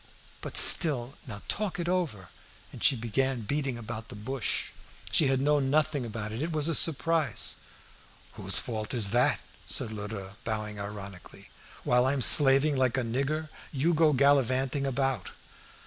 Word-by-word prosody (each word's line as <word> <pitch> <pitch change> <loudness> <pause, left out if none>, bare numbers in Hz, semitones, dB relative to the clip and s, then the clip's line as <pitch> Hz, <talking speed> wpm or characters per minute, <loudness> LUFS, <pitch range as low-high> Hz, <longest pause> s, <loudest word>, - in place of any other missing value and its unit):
"But - - -2
still, 135 -7 +4
now 105 -4 -9
talk 200 -4 -3
it 170 - -3
over." 160 - -3 0.4
And - - -10
she 135 - +4
began 125 +2 -2
beating 135 +2 -3
about 115 -1 -8
the 120 - -9
bush; 120 +3 -4 0.4
she 150 - +3
had 135 -1 +1
known 140 -1 +1
nothing 150 -3 0
about 110 -1 -6
it; 110 +4 -5
it 165 +2 -3
was 155 -1 -1
a 165 - 0
surprise. 160 -3 +1 0.8
"Whose - - +2
fault 110 0 -1
is 105 -5 +3
that?" 120 +2 +2 0.2
said 110 - 0
Lheureux, 100 -2 -8
bowing 110 -2 -4
ironically. 100 -2 -10 0.3
"While 125 +1 +2
I'm 135 -1 0
slaving 140 +2 +6
like 130 -1 0
a 130 - 0
nigger, 140 +7 -3 0.2
you 150 +5 0
go 160 -1 +3
gallivanting 135 0 +1
about." 135 0 -2
130 Hz, 155 wpm, -28 LUFS, 110-145 Hz, 0.8 s, slaving